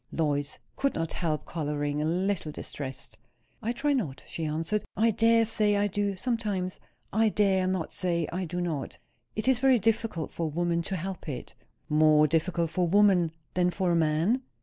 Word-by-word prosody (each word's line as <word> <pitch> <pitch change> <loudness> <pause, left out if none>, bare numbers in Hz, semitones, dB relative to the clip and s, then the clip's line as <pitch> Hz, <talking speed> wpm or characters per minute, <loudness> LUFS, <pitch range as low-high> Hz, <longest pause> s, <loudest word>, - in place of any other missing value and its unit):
Lois 145 -2 -1 0.2
could 275 0 0
not 165 0 -2
help 155 -4 -2
colouring, 145 -2 -2
a - - 0
little 180 0 0
distressed. 130 -7 -7 0.4
"I 230 +1 -1
try 285 +4 0
not," 160 - -2
she 165 - -4
answered. 165 +7 -1
"I 230 +1 +4
dare 230 +1 +4
say 210 -2 +2
I 205 - +2
do, 205 0 -1
sometimes. 205 -6 -2 0.3
I 220 +1 +4
dare 195 -3 +2
not 185 -3 -1
say 170 -3 -1
I 185 +1 -2
do 175 +2 -4
not. 160 -6 -3 0.4
It 215 - -2
is 260 -3 +4
very 265 -1 +5
difficult 225 -6 0
for 165 - -2
a - - -2
woman 170 +2 0
to 190 +3 -3
help 185 -1 -5
it." 130 -4 -6 0.3
"More 155 0 +5
difficult 165 +2 0
for 180 - +1
a 170 - -2
woman 195 -5 +5 0.2
than 180 0 +2
for 180 0 0
a - - +3
man?" 165 +10 +2
180 Hz, 185 wpm, -28 LUFS, 155-210 Hz, 0.4 s, very